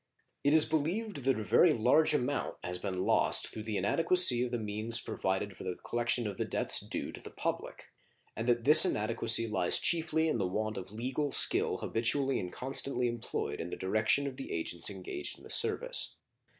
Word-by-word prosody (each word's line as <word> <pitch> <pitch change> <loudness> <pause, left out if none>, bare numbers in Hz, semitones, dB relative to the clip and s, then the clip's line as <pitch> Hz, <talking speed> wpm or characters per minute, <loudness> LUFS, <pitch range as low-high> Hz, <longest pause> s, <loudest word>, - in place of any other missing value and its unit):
It 145 - +1
is 155 - +7
believed 160 - -4
that 135 -4 0
a - - -5
very 170 - +3
large 130 +7 +2
amount 140 +1 -3
has 90 0 -5
been 95 -1 -5
lost - - +3
through 110 - -8
the 110 -2 -4
inadequacy 165 - +4
of 125 - -4
the 120 - -4
means 110 +1 +2
provided 95 0 -4
for - - -11
the 90 -1 -5
collection 120 0 -2
of 100 -2 -6
debts - - +4
due - - -4
to - - -11
the - - -11
public, - - -7 0.4
and 115 +2 -6
that 120 -1 0
this 150 +5 +9
inadequacy 115 +2 +2
lies 95 -5 +3
chiefly 160 -1 0
in 155 - -2
the 95 - -1
want 110 +3 -4
of 95 0 -9
legal 130 +6 -4
skill - - +2
habitually 135 +4 -1
and 90 - -7
constantly 130 -1 -3
employed 120 -7 -5
in 85 - -7
the - - -7
direction 110 +8 0
of 135 -2 -7
the 135 - -9
agents 85 +2 0
engaged 95 -7 -5
in - - -19
the - - -7
service. - - 0
115 Hz, 190 wpm, -30 LUFS, 105-140 Hz, 0.4 s, this